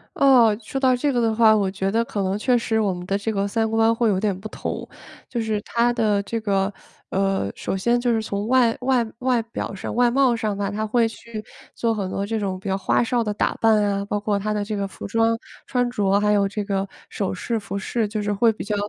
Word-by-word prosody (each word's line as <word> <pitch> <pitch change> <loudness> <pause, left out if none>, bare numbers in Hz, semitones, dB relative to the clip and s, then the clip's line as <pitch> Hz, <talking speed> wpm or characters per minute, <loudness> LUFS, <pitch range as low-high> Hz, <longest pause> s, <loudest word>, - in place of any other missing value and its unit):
哦， 245 -6 +5
说 250 +5 -4
到 260 -1 +4
这 285 +4 0
个 245 - +1
的 225 -2 +2
话， 220 -1 +5
我 200 -2 +1
觉 195 0 -2
得 230 +2 +1
可 205 - -3
能 190 +1 0
确 250 +3 +2
实 225 -1 +1
我 200 -4 +1
们 175 0 -7
的 195 - +1
这 210 +2 -2
个 200 0 0
三 220 +2 0
观 225 +1 +3
会 230 -1 +1
有 190 - +1
点 200 -2 0
不 210 - -7
同。 - - -5 0.4
就 235 - -3
是 220 -2 -1
她 235 +3 +1
的 215 -4 +1
这 230 +3 -3
个， 195 -1 0 0.4
呃， 195 - 0
首 - - -3
先 235 +6 +1
就 240 -1 +1
是 225 - +1
从 205 0 -3
外 245 -2 +3
外 255 -2 +2 0.2
外 250 -2 +2
表 225 -2 -5
上 195 - -5
外 245 0 +4
貌 260 -1 +3
上 215 -3 -2
吧， 200 -1 -2
她 215 +2 -2
会 230 +1 +2
去 225 -1 -8 0.3
做 230 -1 0
很 200 -3 -2
多 195 - -2
这 225 0 -1
种 190 -2 -2
比 195 - -5
较 190 - +1
花 195 - +2
哨 240 0 +1
的 210 -2 -2
打 - - 0
扮 220 -2 +3
啊， 200 0 0
包 205 0 -2
括 205 0 0
她 210 +2 -2
的 210 -1 -1
这 210 +1 -3
个 200 -1 -2
服 - - -8
装 225 +2 +2 0.3
穿 245 -1 0
着， 200 -5 +2
还 210 0 +2
有 200 -1 +3
这 205 +1 -3
个 195 -1 -1 0.2
首 195 -2 -2
饰、 225 +4 -2
服 200 - -7
饰， 215 +3 -1
就 210 0 -3
是 205 0 -1
会 225 +3 +3
比 - - -7
较 210 +1 -2
215 Hz, 275 characters per minute, -23 LUFS, 200-230 Hz, 0.4 s, 哦